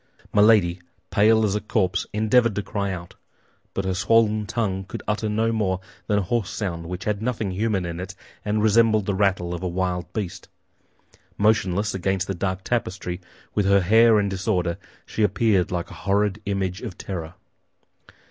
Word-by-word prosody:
Milady, 105 -5 +4 0.3
pale 110 +2 +4
as 100 - 0
a 105 - -1
corpse, 95 -4 0
endeavored 110 +1 +3
to 105 - -1
cry 100 -1 -2
out; 90 0 -7 0.6
but 95 - -1
her 95 - 0
swollen 105 +2 +2
tongue 100 -4 -1
could 95 - -8
utter 105 +1 0
no 110 +2 +1
more 100 -5 0 0.3
than 105 - +2
a 100 - +1
hoarse 105 +1 -1
sound 85 -5 -4
which 90 +2 -5
had 105 -1 -1
nothing 110 -4 -1
human 100 -1 0
in 85 0 -5
it 95 +1 -6 0.3
and 105 0 0
resembled 110 -1 +4
the 100 - 0
rattle 95 -3 +1
of 85 - -5
a 90 - -2
wild 90 0 -2
beast. 100 -6 -5 0.9
Motionless 105 -1 +2
against 95 0 0
the 95 - -3
dark 95 +1 -2
tapestry, 95 -6 -2 0.3
with 105 -2 +1
her 100 0 +5
hair 110 +4 +5
in 100 - +1
disorder, 95 -3 -1 0.3
she - - -4
appeared 100 -1 +2
like 90 0 -3
a 85 -5 -11
horrid 100 +3 +1
image 95 -2 -1
of 90 - -7
terror. 85 -3 -6
100 Hz, 175 wpm, -24 LUFS, 90-110 Hz, 0.9 s, her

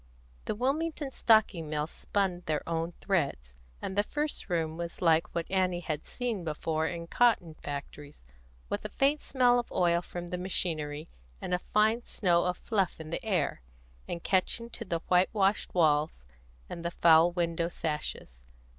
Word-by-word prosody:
The - - -2
Wilmington 285 +4 -1
Stocking 215 -10 +3
Mills 150 +1 -2
spun 190 -3 -1
their 155 -1 -1
own 165 +1 -2
threads, 140 - -1 0.3
and 190 - -3
the 205 - +4
first 295 +2 -3
room 160 -2 0
was 170 0 -5
like 165 -2 +2
what 170 -1 -1
Annie 185 -2 +1
had 155 -3 -3
seen 235 -7 -3
before 160 0 -1
in 170 -1 -4
cotton 195 -4 +2
factories, 145 - -8 0.4
with - - -3
a - - -4
faint 285 +2 +2
smell 245 -2 +3
of 240 - -5
oil 170 -1 +2
from 175 0 -7
the 180 - -3
machinery, 155 -5 -1 0.3
and 180 - -4
a 180 - +2
fine 220 +5 +2
snow 175 -4 +2
of 180 0 0
fluff 195 -8 -1
in 160 0 -8
the 210 - -3
air, 180 - 0 0.5
and 170 - -5
catching 230 +5 0
to 230 - -6
the 170 -3 -2
white 180 +1 +4
washed 200 -1 +1
walls 150 - +2 0.4
and 170 - -7
the 170 - 0
foul 170 0 +5
window 170 -1 0
sashes. 150 - -4
175 Hz, 165 wpm, -30 LUFS, 160-205 Hz, 0.5 s, foul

